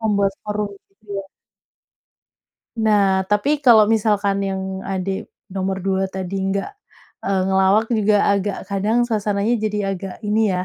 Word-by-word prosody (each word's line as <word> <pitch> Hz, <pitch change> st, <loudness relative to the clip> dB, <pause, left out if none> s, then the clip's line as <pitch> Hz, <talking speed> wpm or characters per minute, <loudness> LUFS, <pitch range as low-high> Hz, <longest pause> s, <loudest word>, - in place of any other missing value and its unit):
membuat 200 Hz, -3 st, +1 dB
forum 210 Hz, 0 st, -2 dB, 0.2 s
gitu, 200 Hz, +2 st, -35 dB
ya? -, -, -3 dB, 1.6 s
Nah, 200 Hz, -3 st, +3 dB
tapi 280 Hz, +9 st, +1 dB
kalau 235 Hz, -6 st, +7 dB
misalkan 210 Hz, -2 st, +1 dB
yang 190 Hz, 0 st, -3 dB, 0.3 s
adik 190 Hz, 0 st, -3 dB, 0.2 s
nomor 190 Hz, 0 st, -2 dB
2 190 Hz, 0 st, 0 dB
tadi 190 Hz, 0 st, -4 dB
nggak, 195 Hz, 0 st, -1 dB, 0.5 s
eee, 195 Hz, -1 st, 0 dB
ngelawak 190 Hz, +3 st, +3 dB
juga, 215 Hz, -2 st, +3 dB, 0.2 s
agak 200 Hz, 0 st, -1 dB
kadang 210 Hz, +4 st, +1 dB
suasananya 215 Hz, -1 st, 0 dB
jadi 210 Hz, -1 st, -1 dB
agak 190 Hz, 0 st, -6 dB
ini 210 Hz, +1 st, +1 dB, 0.2 s
ya, 180 Hz, -, -2 dB
200 Hz, 135 wpm, -21 LUFS, 195-215 Hz, 1.6 s, kalau